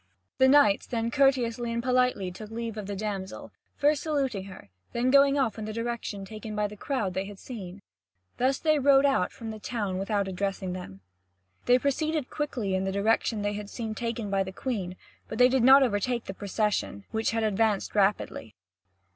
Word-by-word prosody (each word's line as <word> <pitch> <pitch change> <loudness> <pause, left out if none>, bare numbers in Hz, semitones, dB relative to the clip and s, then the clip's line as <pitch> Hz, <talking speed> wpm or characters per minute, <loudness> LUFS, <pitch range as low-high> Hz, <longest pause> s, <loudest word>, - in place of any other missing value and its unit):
The 260 - +6
knights 265 -8 +5
then 230 -1 -2
courteously 245 -4 +2
and 235 0 -2
politely 250 -7 +1
took 210 +4 -9
leave 230 0 -4
of 210 -3 -6
the 205 - -4
damsel, 195 -2 -5 0.3
first 290 0 +2
saluting 270 -11 -1
her, 195 -1 -10
and 100 - -24 0.2
then 245 +2 +1
going 280 0 +5
off 235 -6 0
in 215 - -4
the 215 - -5
direction 230 -3 -4
taken 215 +1 -7
by 210 0 +1
the 210 0 -5
crowd 210 -4 -2
they 190 +1 -2
had 200 0 -9
seen. 195 -5 -9 0.6
Thus 260 +2 +2
they 310 -2 +2
rode 275 0 +5
out 270 -10 +2
from 225 -1 -7
the 215 - -8
town 205 -5 -3
without 200 0 0
addressing 190 0 -3
them. 100 - -8 0.7
They 245 - +6
proceeded 295 +2 -1
quickly 250 -10 -2
in 190 0 0
the 190 - -1
direction 210 +1 +1
they 205 0 0
had 205 0 -6
seen 225 -1 -4
taken 230 -2 -3
by 195 -1 +2
the 190 0 -3
Queen, 190 -5 -4 0.3
but 220 - -6
they 250 +1 +6
did 260 0 +2
not 270 +3 +8
overtake 235 +1 0
the 190 - -5
procession, 205 0 -2
which 220 0 0
had 225 -1 0
advanced 215 -1 +1
rapidly. 195 - 0
220 Hz, 195 wpm, -28 LUFS, 200-255 Hz, 0.7 s, not